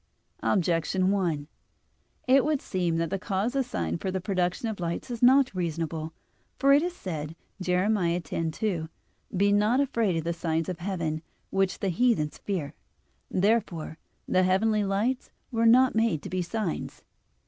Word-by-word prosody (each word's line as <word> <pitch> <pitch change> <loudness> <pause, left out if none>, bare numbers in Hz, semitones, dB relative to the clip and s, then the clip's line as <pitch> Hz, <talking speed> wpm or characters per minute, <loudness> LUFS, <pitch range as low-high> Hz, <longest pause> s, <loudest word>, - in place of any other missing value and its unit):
Objection 185 +1 +1
1: 170 -7 0 0.8
It 265 +1 +6
would 300 -1 +1
seem 175 -7 -1
that 165 -1 -1
the 195 - -1
cause 200 +7 -1
assigned 85 - -1
for - - -2
the 190 0 -1
production 185 +2 -1
of 220 -2 -3
the - - -9
lights 170 +7 -3
is 235 - -5
not 260 0 +5
reasonable. 165 -2 -3 0.5
For 275 0 +5
it 285 - +6
is 350 +1 -2
said 160 - -5 0.3
(Jer. 180 0 +1
10:2): 170 -2 -1 0.5
"Be 200 +2 +4
not 210 +5 +3
afraid 230 -9 +1
of 165 - -2
the 170 +1 -1
signs 165 -1 -1
of 180 -1 -4
heaven, 170 -4 -2 0.3
which 195 -1 +1
the 195 - +1
heathens 180 -6 +1
fear." 175 -9 -3 0.6
Therefore 185 -6 0 0.3
the 185 - +3
heavenly 210 +3 +2
lights 210 +7 -1 0.2
were 230 -1 +2
not 255 +3 +6
made 220 -9 +1
to - - -7
be 185 0 0
signs. 185 0 -4
185 Hz, 160 wpm, -27 LUFS, 165-225 Hz, 0.8 s, It